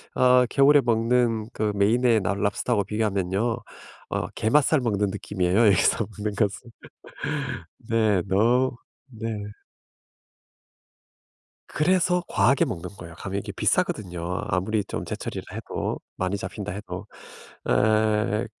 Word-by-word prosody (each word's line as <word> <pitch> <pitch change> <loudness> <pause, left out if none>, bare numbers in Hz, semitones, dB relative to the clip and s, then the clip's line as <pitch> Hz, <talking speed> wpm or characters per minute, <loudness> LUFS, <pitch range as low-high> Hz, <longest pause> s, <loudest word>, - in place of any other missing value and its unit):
어 125 0 +5
겨울에 140 +1 +5
먹는 115 -1 +1
그 105 -1 0
메인의 115 +2 +3
라 90 - +1
랍스터 100 +4 -1
하고 100 - +2
비교하면요. 105 +1 -1 0.5
어 - - -2
게맛살 150 +6 +3
먹는 105 -4 0
느낌이에요. 100 +1 +1
여기서 100 +2 +3
먹는 105 0 -2
것은. 105 +3 -1 1.2
네. 110 -5 +3
너 120 +7 +3 0.4
네. 115 -3 -6 2.4
그래서 180 +2 +2
과하게 115 +8 +3
먹는 90 +1 -5
거예요. 85 -1 -10
가면 100 +2 -4
이게 - - -6
비싸거든요. 90 -5 0 0.3
아무리 100 +3 0
좀 - - -4
제철이라 - - -5
해도 - - -4 0.2
많이 95 +2 -1
잡힌다 105 0 -5
해도. 105 +3 -7 0.6
어 110 0 +2
110 Hz, 260 characters per minute, -25 LUFS, 100-120 Hz, 2.4 s, 어